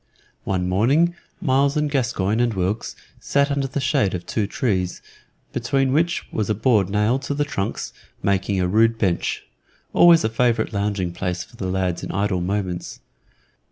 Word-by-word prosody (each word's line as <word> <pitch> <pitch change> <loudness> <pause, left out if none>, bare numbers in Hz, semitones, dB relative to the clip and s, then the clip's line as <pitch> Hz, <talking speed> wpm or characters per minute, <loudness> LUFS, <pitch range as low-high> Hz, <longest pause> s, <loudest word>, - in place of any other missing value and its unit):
One 90 -2 -1
morning 135 - +3 0.3
Myles 140 0 +2
and 150 0 +1
Gascoyne 120 -7 0
and 120 -3 +1
Wilkes 95 +4 -2 0.2
sat 140 0 +1
under 140 -1 0
the 135 - -3
shade 130 -8 +1
of 90 - -6
two 105 -3 -1
trees, 95 -6 -1 0.5
between 135 -1 +1
which 170 +4 +1
was 110 -1 -1
a 105 - +2
board 110 -3 +2
nailed 105 +6 +1
to 140 +1 -3
the 145 0 0
trunks, 100 -9 -3 0.3
making 100 0 +1
a 90 - +1
rude 115 +4 +3
bench 95 -6 -1 0.5
always 170 -1 +7
a 110 - +1
favorite 115 -1 +1
lounging 100 -3 -1
place 90 0 -3
for - - -18
the 95 -5 -4
lads 95 -1 -1
in - - -4
idle 100 -2 0
moments. 95 -1 -3
110 Hz, 165 wpm, -22 LUFS, 95-135 Hz, 0.5 s, always